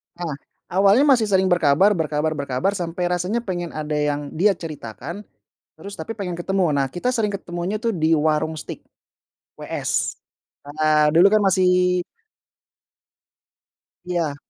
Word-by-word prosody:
Nah, 170 Hz, -2 st, -4 dB, 0.4 s
awalnya 195 Hz, +7 st, +4 dB
masih 235 Hz, -5 st, +3 dB
sering 190 Hz, -2 st, +2 dB
berkabar 175 Hz, +3 st, +4 dB
berkabar 155 Hz, -4 st, -1 dB
berkabar, 140 Hz, +7 st, -1 dB
sampai 180 Hz, -2 st, -4 dB
rasanya 180 Hz, +7 st, -1 dB
pengen 175 Hz, -5 st, -4 dB
ada 155 Hz, 0 st, -3 dB
yang 145 Hz, -1 st, -1 dB
dia 195 Hz, +4 st, +2 dB
ceritakan, 155 Hz, -, -8 dB, 0.5 s
terus 200 Hz, +1 st, -10 dB
tapi 225 Hz, +8 st, -5 dB
pengen 180 Hz, -5 st, -5 dB
ketemu. 195 Hz, +2 st, 0 dB
Nah, 140 Hz, -2 st, +1 dB
kita 175 Hz, -, -2 dB
sering 225 Hz, -4 st, 0 dB
ketemunya, 175 Hz, +1 st, -4 dB
tuh, 230 Hz, -, +1 dB
di 165 Hz, -4 st, +2 dB
Waroeng 155 Hz, +1 st, 0 dB
Steak, 155 Hz, -, -7 dB, 0.8 s
WS, -, -, -2 dB, 0.5 s
eee, 150 Hz, 0 st, +2 dB
dulu, 170 Hz, +3 st, +6 dB
kan, 215 Hz, -, +4 dB
masih 180 Hz, -1 st, +3 dB, 2.0 s
Iya. 170 Hz, -5 st, -2 dB
175 Hz, 130 wpm, -22 LUFS, 155-195 Hz, 2.0 s, dulu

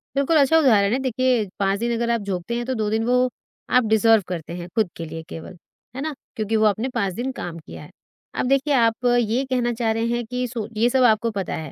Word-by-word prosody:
बिल्कुल 280 Hz, +4 st, +2 dB
अच्छा 290 Hz, +3 st, +5 dB
उदाहरण 220 Hz, -7 st, +4 dB
है। 260 Hz, -, +1 dB
देखिए, 255 Hz, -3 st, +1 dB
5 195 Hz, 0 st, +1 dB
दिन 235 Hz, +1 st, -1 dB
अगर 235 Hz, 0 st, -1 dB
आप 235 Hz, -2 st, 0 dB
झोंकते 195 Hz, +2 st, -3 dB
हैं 240 Hz, 0 st, -2 dB
तो 260 Hz, -, -2 dB
2 215 Hz, -2 st, -1 dB
दिन 220 Hz, +1 st, 0 dB
वो 250 Hz, +1 st, +2 dB, 0.4 s
आप 250 Hz, -, +4 dB
डिज़र्व 220 Hz, 0 st, +4 dB
करते 170 Hz, -2 st, -5 dB
हैं 175 Hz, -1 st, -7 dB
खुद 220 Hz, -5 st, +2 dB
के 165 Hz, -, -5 dB
लिए 160 Hz, +1 st, -7 dB
केवल। 165 Hz, +3 st, -9 dB, 0.4 s
है 265 Hz, -, -4 dB
ना? 310 Hz, +1 st, -3 dB, 0.2 s
क्योंकि 220 Hz, -1 st, -1 dB
वो 220 Hz, 0 st, +3 dB
आपने 215 Hz, +5 st, +1 dB
5 200 Hz, -5 st, 0 dB
दिन 250 Hz, +7 st, -3 dB
काम 175 Hz, -10 st, -6 dB
किया 80 Hz, -, -11 dB
है। -, -, -13 dB, 0.5 s
अब -, -, +1 dB
देखिए 275 Hz, +2 st, +2 dB
आप 230 Hz, -1 st, +2 dB
ये 240 Hz, +3 st, 0 dB
कहना 250 Hz, -2 st, 0 dB
चाह 225 Hz, -1 st, 0 dB
रहे 225 Hz, +1 st, -1 dB
हैं 240 Hz, 0 st, -1 dB
कि 250 Hz, +2 st, -3 dB
सो 230 Hz, -3 st, -5 dB
ये 235 Hz, +3 st, +3 dB
सब 260 Hz, +1 st, +2 dB
आपको 230 Hz, -1 st, +3 dB
पता 195 Hz, -3 st, -3 dB
है 155 Hz, -3 st, -6 dB
230 Hz, 245 wpm, -22 LUFS, 205-250 Hz, 0.5 s, अच्छा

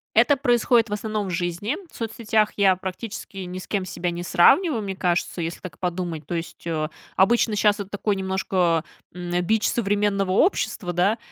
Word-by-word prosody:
Это 240 Hz, +6 st, +5 dB
происходит 240 Hz, -3 st, +3 dB
в -, -, -3 dB
основном 210 Hz, -1 st, -2 dB
в -, -, -4 dB
жизни. 175 Hz, -, -2 dB
В -, -, -18 dB
соцсетях 220 Hz, -1 st, 0 dB
я 195 Hz, -2 st, +5 dB
практически 195 Hz, +2 st, -7 dB
ни 185 Hz, 0 st, -5 dB
с -, -, -10 dB
кем 195 Hz, -3 st, -1 dB
себя 175 Hz, -1 st, -3 dB
не 175 Hz, +1 st, -5 dB
сравниваю, 270 Hz, -, +4 dB
мне 195 Hz, -2 st, -4 dB
кажется, 175 Hz, -1 st, -1 dB
если 165 Hz, +1 st, -4 dB
так 185 Hz, -, -9 dB
подумать 175 Hz, -4 st, -3 dB
То 175 Hz, -, -3 dB
есть, 165 Hz, 0 st, -6 dB
о, 155 Hz, -1 st, -1 dB, 0.3 s
обычно 220 Hz, +2 st, +3 dB
щас, 210 Hz, 0 st, +3 dB
это 200 Hz, -1 st, -5 dB
такой 205 Hz, 0 st, -1 dB
немножко, 190 Hz, -3 st, +1 dB, 0.3 s
м, 175 Hz, 0 st, -2 dB
бич 220 Hz, +2 st, +2 dB
современного 200 Hz, -3 st, +1 dB
общества, 190 Hz, -, +1 dB
да. 195 Hz, +6 st, +2 dB
195 Hz, 180 wpm, -24 LUFS, 175-215 Hz, 0.3 s, Это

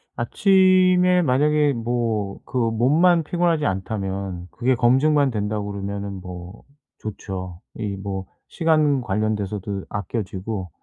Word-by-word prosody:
아침에 185 Hz, -, +4 dB
만약에 150 Hz, +1 st, +2 dB
뭐 115 Hz, -4 st, -2 dB
그 130 Hz, -, -5 dB
몸만 140 Hz, +10 st, +3 dB
피곤하지 170 Hz, -1 st, 0 dB
않다면 95 Hz, -2 st, -3 dB
그게 130 Hz, +1 st, +1 dB
검증만 135 Hz, +4 st, +3 dB
된다고 105 Hz, -1 st, -2 dB
그러면은 100 Hz, 0 st, -5 dB
뭐 90 Hz, +2 st, -9 dB, 0.4 s
좋죠. 95 Hz, -4 st, -6 dB
이 105 Hz, -3 st, -3 dB
뭐 95 Hz, -1 st, -5 dB, 0.3 s
시간 155 Hz, -5 st, +3 dB
관련돼서도 105 Hz, -2 st, -2 dB
아껴지고 100 Hz, -1 st, -4 dB
110 Hz, 250 characters per minute, -22 LUFS, 100-150 Hz, 0.4 s, 아침에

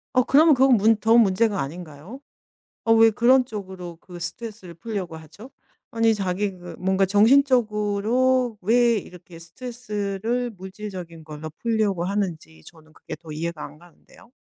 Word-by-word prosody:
어 255 Hz, -, +6 dB
그러면 305 Hz, +5 st, +5 dB
그건 260 Hz, -2 st, +4 dB
문 220 Hz, +2 st, +4 dB
더 225 Hz, +2 st, +3 dB
문제가 205 Hz, -1 st, +3 dB
아닌가요? 160 Hz, -, -8 dB, 0.7 s
어 225 Hz, -, +5 dB
왜 225 Hz, 0 st, +6 dB
그런 250 Hz, +4 st, +4 dB
쪽으로 190 Hz, -7 st, -8 dB
그 175 Hz, -1 st, -12 dB
스트레스를 185 Hz, 0 st, -8 dB
풀려고 185 Hz, -2 st, -5 dB
하죠? 160 Hz, -, -13 dB, 0.4 s
아니 225 Hz, -1 st, +2 dB
자기 200 Hz, 0 st, -2 dB
그 175 Hz, -2 st, -10 dB
뭔가 190 Hz, +1 st, +1 dB
정신적으로 230 Hz, +1 st, +2 dB
왜 235 Hz, +3 st, +3 dB
이렇게 180 Hz, -2 st, -14 dB
스트레스를 225 Hz, +3 st, -4 dB
물질적인 190 Hz, -4 st, -9 dB
걸로 155 Hz, 0 st, -8 dB
풀려고 215 Hz, -6 st, 0 dB
하는지 180 Hz, -, -4 dB
저는 160 Hz, -1 st, -17 dB
그게 -, -, -9 dB
더 165 Hz, -2 st, -13 dB
이해가 165 Hz, +1 st, -5 dB
안 150 Hz, -, -13 dB
가는데요. 175 Hz, +6 st, -21 dB
205 Hz, 330 characters per minute, -23 LUFS, 175-230 Hz, 0.7 s, 어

